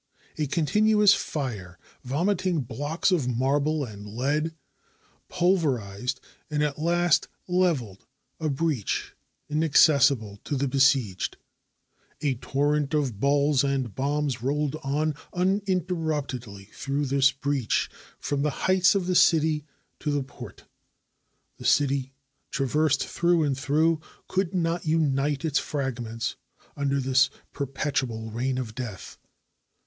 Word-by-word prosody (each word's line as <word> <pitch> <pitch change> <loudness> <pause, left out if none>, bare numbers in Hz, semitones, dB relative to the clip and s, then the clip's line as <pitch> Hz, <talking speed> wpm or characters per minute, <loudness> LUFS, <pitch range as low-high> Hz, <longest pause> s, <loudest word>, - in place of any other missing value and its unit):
A 150 -2 -1
continuous 210 +7 +4
fire, 105 - -4 0.3
vomiting 175 +5 0
blocks 145 - -1
of 160 -9 +1
marble 140 +4 +1
and 105 -3 -10
lead, 145 +8 -1 0.7
pulverized, 130 - 0 0.3
and 150 -1 0
at 150 -1 -1
last 175 0 +2 0.2
leveled 165 - 0 0.3
a 160 -1 -1
breach 140 -6 -1 0.3
inaccessible 140 -8 +4
to 145 - -2
the 140 +1 0
besieged. 130 -7 +2 0.8
A 145 -3 +1
torrent 145 +4 0
of 130 -9 -1
balls 140 +1 +3
and 135 -5 -1
bombs 140 -2 -1
rolled 145 +3 0 0.6
uninterruptedly 160 - -2
through 140 +1 -2
this 135 0 +4
breach 135 -3 0 0.3
from 145 -1 -2
the 150 - +2 0.2
heights 190 +1 +4
of 195 -3 +1
the 185 - 0
city 155 -3 +4 0.3
to 150 - -3
the 145 -1 0
port. 130 - -11 1.0
The - - -9
city, 135 -2 +2 0.4
traversed 145 +1 +1
through 170 -1 +2
and 140 -2 +1
through, 155 +4 +1 0.3
could 190 -1 -1
not 170 -1 0
unite 145 -2 +1
its 155 -2 +2
fragments 125 -5 -3 0.4
un 140 -2 -1
der 140 0 +1
this 130 0 +3 0.2
perpetual 135 -5 -2
reign 130 +3 -1
of 120 -4 -4
death. 115 -6 -7
145 Hz, 115 wpm, -26 LUFS, 130-160 Hz, 1.0 s, continuous